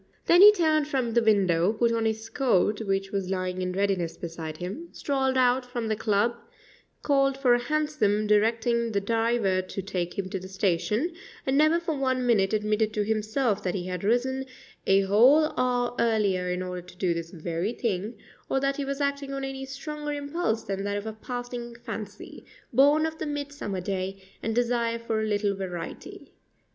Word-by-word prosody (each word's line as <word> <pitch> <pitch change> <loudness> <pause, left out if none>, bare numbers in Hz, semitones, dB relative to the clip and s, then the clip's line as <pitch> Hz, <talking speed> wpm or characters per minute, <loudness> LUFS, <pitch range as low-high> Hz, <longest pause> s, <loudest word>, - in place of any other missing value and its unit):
Then 350 +2 +6
he 415 +1 +11
turned 315 -6 +2
from 260 -5 -1
the 235 +1 +3
window, 195 -4 +3
put 230 +1 +2
on 230 -1 0
his 220 0 -1
coat, 225 -4 +1
which 195 -2 -1
was 195 -2 -2
lying 185 -1 -2
in 180 0 -1
readiness 185 -4 0
beside 165 -2 -6
him, 195 - -6
strolled 265 -2 0
out 255 0 +3
from 245 -2 -4
the 215 - +1
club, 215 +1 +1 0.7
called 275 -2 +2
for 260 -3 +4
a 240 - +3
hansom, 245 -6 0
directing 230 +2 +2
the 200 - +2
driver 225 -2 +1
to 185 +1 -6
take 180 -3 -3
him 195 -1 -2
to 190 - -2
the 185 - -9
station, 190 - 0 0.3
and 265 - +1
never 310 +3 +4
for 335 -2 -2
one 260 -2 0
minute 200 -5 +3
admitted 215 0 +1
to 210 - +1
himself 215 +1 0
that 180 0 -2
he 180 -2 -3
had 180 0 -4
risen 260 +5 +1 0.4
a 195 +1 +5
whole 250 +11 +5
hour 245 -1 +1
earlier 205 -6 +1
in 180 +1 -2
order 180 -1 -5
to 180 0 -16
do 180 -2 +1
this 165 0 -5
very 170 +3 -3
thing, 215 -1 -2 0.3
or 270 - +2
that 275 0 0
he 285 - -2
was 275 +1 -3
acting 280 0 -1
on 275 0 -4
any 270 0 -4
stronger 295 +2 -5
impulse 285 -5 -2
than 195 0 -3
that 205 0 -1
of 205 - -5
a 220 - -4
passing 245 +1 -6
fancy, 225 -4 -8 0.3
born 290 +5 +5
of 320 0 -4
the 315 - -3
midsummer 285 -9 -4
day, 190 +1 -3 0.2
and 225 0 -2
desire 235 -1 +1
for 230 -1 -2
a - - 0
little 205 -1 +1
variety. 180 -3 -7
225 Hz, 190 wpm, -27 LUFS, 195-265 Hz, 0.7 s, he